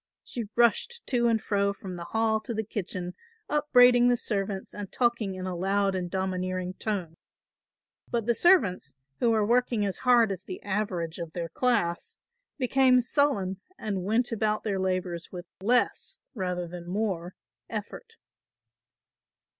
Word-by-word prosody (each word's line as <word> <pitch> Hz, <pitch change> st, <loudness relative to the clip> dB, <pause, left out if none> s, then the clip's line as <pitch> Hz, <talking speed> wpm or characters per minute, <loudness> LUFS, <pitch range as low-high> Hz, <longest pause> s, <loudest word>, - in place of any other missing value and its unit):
She 235 Hz, -3 st, -5 dB
rushed 240 Hz, -, +2 dB
to 240 Hz, -2 st, +2 dB
and 225 Hz, -1 st, +3 dB
fro 200 Hz, -1 st, 0 dB
from 190 Hz, -2 st, -8 dB
the 170 Hz, -1 st, -6 dB
hall 220 Hz, +1 st, +1 dB
to 220 Hz, +2 st, -5 dB
the 220 Hz, -, -1 dB
kitchen 185 Hz, -4 st, -4 dB, 0.3 s
upbraiding 245 Hz, -5 st, +5 dB
the 245 Hz, 0 st, +4 dB
servants 195 Hz, -3 st, -3 dB
and 205 Hz, -2 st, -7 dB
talking 235 Hz, -5 st, 0 dB
in 185 Hz, 0 st, -5 dB
a 185 Hz, -1 st, -3 dB
loud 195 Hz, +2 st, +1 dB
and 180 Hz, -2 st, -2 dB
domineering 185 Hz, -1 st, -2 dB
tone. 185 Hz, -6 st, -3 dB, 0.9 s
But 235 Hz, -3 st, -1 dB
the 235 Hz, -, +3 dB
servants, 200 Hz, -, +3 dB, 0.2 s
who 240 Hz, -, +3 dB
were 220 Hz, -2 st, +3 dB
working 235 Hz, -2 st, +2 dB
as 195 Hz, -, -2 dB
hard 240 Hz, -4 st, +4 dB
as 190 Hz, -2 st, -4 dB
the 185 Hz, -, -7 dB
average 190 Hz, -5 st, -2 dB
of 170 Hz, -1 st, -6 dB
their 170 Hz, -2 st, -4 dB
class, 175 Hz, -9 st, 0 dB, 0.4 s
became 260 Hz, -1 st, +4 dB
sullen 235 Hz, -8 st, +1 dB, 0.2 s
and 200 Hz, -4 st, -3 dB
went 225 Hz, +6 st, +1 dB
about 215 Hz, -1 st, 0 dB
their 200 Hz, -3 st, -1 dB
labours 185 Hz, -2 st, -2 dB
with 180 Hz, -1 st, -7 dB, 0.2 s
less 240 Hz, +5 st, +1 dB, 0.2 s
rather 180 Hz, -5 st, -2 dB
than 175 Hz, 0 st, -9 dB
more 185 Hz, -3 st, -2 dB, 0.3 s
effort. 460 Hz, -1 st, -7 dB
200 Hz, 150 wpm, -28 LUFS, 185-235 Hz, 0.9 s, upbraiding